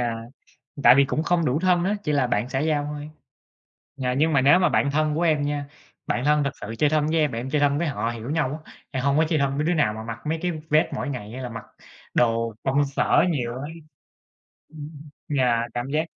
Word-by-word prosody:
Dạ, 120 Hz, -1 st, -1 dB, 0.7 s
tại -, -, +8 dB
vì 140 Hz, +1 st, +5 dB
cũng 150 Hz, +3 st, -1 dB
không 170 Hz, 0 st, +1 dB
đủ 130 Hz, +1 st, +1 dB
thân 180 Hz, -1 st, +2 dB
á, 200 Hz, -, +1 dB
chỉ 150 Hz, -, 0 dB
là 140 Hz, -3 st, +2 dB
bạn 115 Hz, +1 st, -1 dB
xã 135 Hz, -, -2 dB
giao 150 Hz, 0 st, 0 dB
thôi. 150 Hz, 0 st, -6 dB, 0.9 s
Dạ, 125 Hz, -2 st, -1 dB
nhưng 155 Hz, +3 st, +2 dB
mà 135 Hz, -, +4 dB
nếu 145 Hz, +7 st, +6 dB
mà 185 Hz, -, +3 dB
bạn 140 Hz, -, +1 dB
thân 155 Hz, +1 st, +1 dB
của 165 Hz, -, -1 dB
em 155 Hz, -4 st, +2 dB
nha, 145 Hz, 0 st, -2 dB, 0.4 s
bạn 125 Hz, -, -1 dB
thân 150 Hz, 0 st, +3 dB
thực 140 Hz, -, -1 dB
sự 110 Hz, +3 st, -6 dB
chơi 150 Hz, -1 st, +3 dB
thân 155 Hz, -1 st, +2 dB
với 160 Hz, -, 0 dB
em, 150 Hz, -2 st, +2 dB
và 115 Hz, -, -3 dB
em 130 Hz, +3 st, -5 dB
chơi 150 Hz, 0 st, +1 dB
thân 145 Hz, 0 st, +2 dB
với 170 Hz, -, 0 dB
họ 125 Hz, -6 st, -2 dB
hiểu 115 Hz, +2 st, -6 dB
nhau 150 Hz, -1 st, -1 dB
á, -, -, -16 dB, 0.2 s
em 130 Hz, -2 st, -3 dB
hông 140 Hz, 0 st, +2 dB
có 160 Hz, -, +4 dB
chơi 160 Hz, -3 st, +1 dB
thân 140 Hz, 0 st, 0 dB
với 150 Hz, -, 0 dB
đứa 175 Hz, -, +2 dB
nào 145 Hz, -9 st, +2 dB
mà 110 Hz, -, -7 dB
mặc 115 Hz, 0 st, -6 dB
mấy 160 Hz, +1 st, -1 dB
cái 180 Hz, -, 0 dB, 0.2 s
vest 155 Hz, +1 st, +4 dB
mỗi -, -, -3 dB
ngày 125 Hz, -7 st, -5 dB
hay 130 Hz, +1 st, -6 dB
là 125 Hz, -, -4 dB
mặc 115 Hz, -1 st, -8 dB, 0.5 s
đồ 115 Hz, -1 st, +1 dB
công 140 Hz, +2 st, +2 dB
sở 140 Hz, +5 st, +2 dB
nhiều 125 Hz, -7 st, -2 dB
á. 130 Hz, -, -6 dB, 1.1 s
Ừm. 150 Hz, -1 st, -9 dB, 0.5 s
Dạ, 120 Hz, -3 st, +2 dB
cảm 120 Hz, +2 st, -3 dB
giác 155 Hz, +3 st, 0 dB
145 Hz, 250 wpm, -24 LUFS, 125-155 Hz, 1.1 s, tại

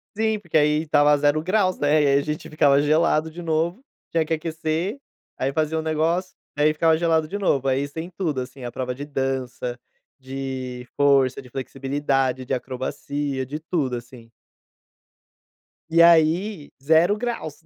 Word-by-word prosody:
Sim, 220 Hz, 0 st, +1 dB
porque 175 Hz, -6 st, -9 dB
aí 150 Hz, +1 st, +3 dB
estava 145 Hz, -1 st, +4 dB
0 145 Hz, +1 st, +2 dB
graus, 185 Hz, +1 st, +1 dB
né, 150 Hz, +1 st, +3 dB
e, -, -, +3 dB
aí, 140 Hz, 0 st, +4 dB
a -, -, -1 dB
gente 150 Hz, +1 st, -4 dB
ficava 145 Hz, -3 st, +3 dB
gelado 155 Hz, +1 st, +2 dB
de 175 Hz, +2 st, -8 dB
novo, 165 Hz, +7 st, -1 dB, 0.3 s
tinha 165 Hz, -1 st, +2 dB
que 160 Hz, -, -12 dB
aquecer, 165 Hz, -, -3 dB, 0.4 s
aí, 135 Hz, -, -1 dB
fazia 155 Hz, +2 st, 0 dB
o -, -, -1 dB
negócio, 160 Hz, +4 st, -1 dB, 0.2 s
aí, 150 Hz, +1 st, +3 dB
ficava 160 Hz, +1 st, +3 dB
gelado 160 Hz, -1 st, +1 dB
de 200 Hz, -, -6 dB
novo, 135 Hz, -9 st, +1 dB
aí, 135 Hz, +1 st, +2 dB
isso 140 Hz, +1 st, -8 dB
tem 165 Hz, +3 st, -5 dB
tudo 155 Hz, -8 st, -1 dB
assim, 125 Hz, +1 st, -9 dB
a 120 Hz, -, -5 dB
prova 125 Hz, +1 st, -3 dB
de 140 Hz, +3 st, -7 dB
dança, 130 Hz, -3 st, -3 dB, 0.4 s
de 130 Hz, -2 st, -6 dB
força, 140 Hz, -3 st, +3 dB
de 125 Hz, -, -15 dB
flexibilidade, 135 Hz, 0 st, -1 dB
de 135 Hz, -, -2 dB
acrobacia, 130 Hz, +2 st, -3 dB
de 145 Hz, +4 st, -6 dB
tudo 155 Hz, -6 st, -2 dB
assim. 120 Hz, -1 st, -10 dB, 1.6 s
E, 165 Hz, +1 st, +4 dB
aí, 170 Hz, +1 st, +4 dB
0 165 Hz, +7 st, +4 dB
graus 230 Hz, -11 st, -4 dB
150 Hz, 165 wpm, -23 LUFS, 135-165 Hz, 1.6 s, estava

